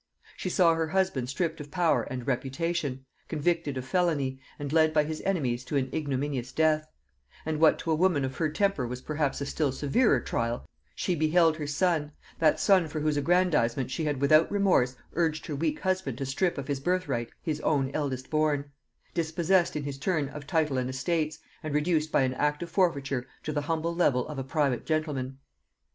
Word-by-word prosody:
She 185 - -4
saw 175 -2 +4
her 165 0 0
husband 165 -8 0
stripped 165 +3 -2
of 145 - -9
power 170 +1 +2
and 130 -3 -5
reputation, 135 +1 -2 0.2
convicted 160 -2 -1
of 130 - -4
felony, 140 -4 0 0.2
and 145 0 -5
led 155 -1 +4
by 150 - +5
his 155 +1 -4
enemies 130 -11 0
to 145 - -1
an 130 -1 -1
ignominious 140 -4 -2
death; 155 -1 +2 0.6
and 155 -1 -1
what 160 -1 +5
to 165 - -3
a - - +4
woman 160 -5 +2
of 130 0 -5
her 160 - +1
temper 160 -5 0
was 125 +1 -5
perhaps 150 -2 -1
a - - -1
still 145 0 0
severer 145 - +2
trial, 115 +1 -2 0.3
she 180 - 0
beheld 160 0 +3
her 150 -2 -4
son, 150 -1 0 0.3
that 155 -2 +4
son 190 -5 +4
for 155 0 -4
whose 150 0 +1
aggrandizement 145 -6 +2
she 155 +5 -2
had 145 -3 -1
without 155 +3 +5
remorse 185 -11 +3 0.2
urged 160 -2 0
her 150 - -4
weak 155 +1 -1
husband 185 -10 -1
to 135 - -3
strip 160 +7 0
of 135 -1 -5
his 140 -2 -1
birthright 175 -7 -1
his 155 -3 -3
own 135 -3 +1
eldest 130 -4 -3
born, 150 -2 +1 0.4
dispossessed 170 +2 +1
in 150 - -2
his 140 -1 -5
turn 150 -3 0
of 145 0 -9
title 155 -5 +1
and 125 0 -2
estates, 155 +4 -1 0.2
and 155 -3 -4
reduced 155 0 +1
by - - +3
an 130 -1 0
act 150 +4 0
of 170 - -8
forfeiture 140 -9 0 0.2
to 155 - -3
the 145 - 0
humble 165 +2 -1
level 140 -8 +2
of 150 -3 -5
a - - -2
private 135 -2 0
gentleman. 145 -5 -2
150 Hz, 195 wpm, -28 LUFS, 135-165 Hz, 0.6 s, by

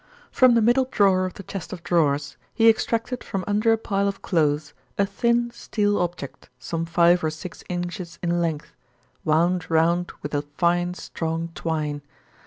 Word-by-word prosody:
From 255 -2 +5
the 230 - +4
middle 245 +4 +4
drawer 195 -6 +3
of 185 - -9
the 195 - -9
chest 190 -2 -7
of 175 -3 -7
drawers, 145 -5 +1 0.2
he 225 -1 +4
extracted 230 +2 +1
from 195 -1 -3
under 210 +2 +2
a 225 - +4
pile 200 -2 -1
of 200 0 -4
clothes 150 -3 0 0.2
a 200 - +3
thin 235 +4 +1
steel 205 -3 -1
object, 175 -6 -4
some 165 +6 -4
five 175 +1 +4
or 155 - +2
six 155 +3 -9
inches 175 -1 -4
in 175 0 +1
length, 160 -3 -3 0.5
wound 170 +3 +1
round 170 +2 +2
with 145 - -5
a 145 - +1 0.2
fine, 175 0 +1
strong 165 -1 -4
twine. 155 -3 -2
175 Hz, 170 wpm, -24 LUFS, 165-205 Hz, 0.5 s, From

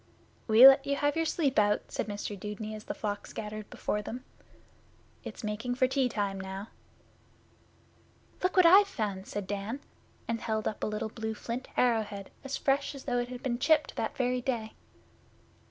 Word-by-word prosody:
'We 230 +4 +10
let 270 +1 +6
you 280 - +1
have 290 +1 +1
your 325 0 +1
sleep 285 -7 +1
out,' 205 0 +1
said - - -2
Mr 205 0 -4
Dudeney, 210 +2 -6
as 215 0 -8
the - - -4
flock 205 -1 -4
scattered 215 0 -6
before 210 - -2
them. 245 +5 -7 1.0
'It's - - -8
making 215 +4 -2
for 255 +1 +3
tea 260 -1 +1
time 200 -4 -2
now.' 190 +2 -6 1.7
'Look 365 +1 0
what 365 - +7
I've 390 +4 +8
found, 210 - -3
said 205 -1 -4
Dan, 205 +6 -4 0.5
and 230 -1 -2
held 220 -1 -1
up 215 - -4
a - - +1
little 215 +1 -3
blue 220 0 -4
flint 240 +4 -5
arrow 235 -3 +4
head 200 -2 -8
as 270 0 -3
fresh 280 +1 0
as 275 - -9
though 245 -2 0
it 245 0 -3
had 250 +1 -8
been 240 -3 -1
chipped 310 +2 +3
that - - -3
very 250 -1 0
day. 235 -4 -2
230 Hz, 185 wpm, -30 LUFS, 210-265 Hz, 1.7 s, We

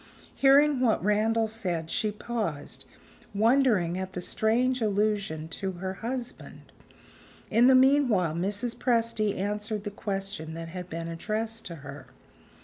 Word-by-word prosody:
Hearing 280 +1 +5
what 240 -7 +2
Randal 220 +2 +2
said, 180 -7 -3
she 215 - 0
paused, 210 -9 -5 0.5
wondering 215 -6 +3
at 190 0 -5
the 180 - -4
strange 245 +6 +1
allusion 205 -6 0
to 190 +3 -4
her 185 +1 -4
husband. 245 +1 -6 0.8
In 235 +3 +5
the 260 - +7
meanwhile, 255 - +4
Mrs. 205 +7 -2
Presty 230 -4 0
answered 210 +1 -3
the 205 - -4
question 195 -5 -5
that 165 0 -6
had 180 +1 -7
been 165 0 -5
addressed 220 +6 -3
to 170 - -7
her. 140 -2 -9
210 Hz, 135 wpm, -27 LUFS, 180-230 Hz, 0.8 s, the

